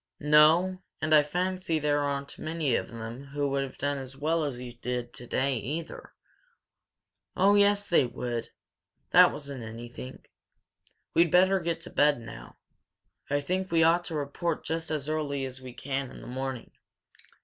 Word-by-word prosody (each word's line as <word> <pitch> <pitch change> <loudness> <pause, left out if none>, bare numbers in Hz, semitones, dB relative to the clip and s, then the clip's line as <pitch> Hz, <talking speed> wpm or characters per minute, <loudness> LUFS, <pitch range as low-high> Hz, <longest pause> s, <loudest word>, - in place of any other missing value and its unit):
"No, 160 +5 +5 0.2
and 155 - +1
I 150 - +8
fancy 180 +2 -1
there 145 -1 +1
aren't 140 -1 -3
many 155 -4 -1
of - - 0
them 115 +3 -7
who 145 +1 -2
would 140 0 0
have 135 -1 -6
done 145 0 -1
as 135 0 -9
well 160 +3 +1
as 135 -5 -3
you 125 -1 -7
did 120 0 -4
today, 130 +2 -1
either!" 150 +9 -6 1.2
"Oh 195 +2 +5
yes, 205 0 +4
they 165 -7 +4
would! 120 -1 -4 0.6
That - - +8
wasn't 140 -3 -7
anything. 120 +3 -9 0.9
We'd 170 0 +4
better 190 +3 +5
get 170 -1 -2
to - - -8
bed 145 -2 +3
now. 115 -1 -11 0.7
I 145 0 +1
think 185 +5 -2
we 165 -1 +4
ought 170 +2 +4
to 165 - -5
report 150 +3 -2
just 160 +1 -2
as 150 -3 -2
early 145 -3 -1
as 130 0 -7
we 130 -1 -8
can 135 +1 -3
in - - -11
the - - -10
morning. 130 -1 -5
145 Hz, 165 wpm, -28 LUFS, 130-165 Hz, 1.2 s, I